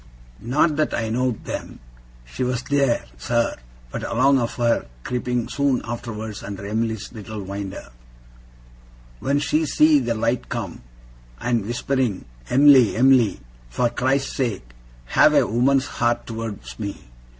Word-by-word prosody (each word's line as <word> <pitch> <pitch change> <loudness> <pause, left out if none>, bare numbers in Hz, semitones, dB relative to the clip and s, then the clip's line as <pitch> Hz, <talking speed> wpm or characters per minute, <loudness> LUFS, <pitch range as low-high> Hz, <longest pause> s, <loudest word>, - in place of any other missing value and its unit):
Not 145 +6 +2
that 155 - +1
I 110 -1 -2
know'd 125 0 -1
then, - - -5 0.5
she 90 - -4
was 125 0 -1
theer, 140 -4 +1
sir, 115 - 0 0.4
but - - -4
along 135 +3 +3
of 120 -1 -2
her 120 -1 +1 0.2
creeping 125 -1 -2
soon 140 -3 0
arterwards 110 -3 -6
under 100 0 -7
Em'ly's 110 +1 -2
little 110 -1 -7
winder, 100 -5 -6 1.3
when 140 +1 +1
she 150 +2 +1
see 150 +1 +5
the 120 -3 -1
light 115 +2 -1
come, 110 -8 -5 0.6
and 115 -4 0
whispering 120 -3 -1 0.2
"Em'ly, 135 -4 +6
Em'ly, 125 - +4 0.3
for 120 - +1
Christ's 135 +2 0
sake, 110 - -2 0.4
have - - +4
a - - +5
woman's 130 +4 +2
heart 120 -2 -1
towards 115 -2 -6
me. 100 -2 -4
120 Hz, 135 wpm, -22 LUFS, 110-130 Hz, 1.3 s, Em'ly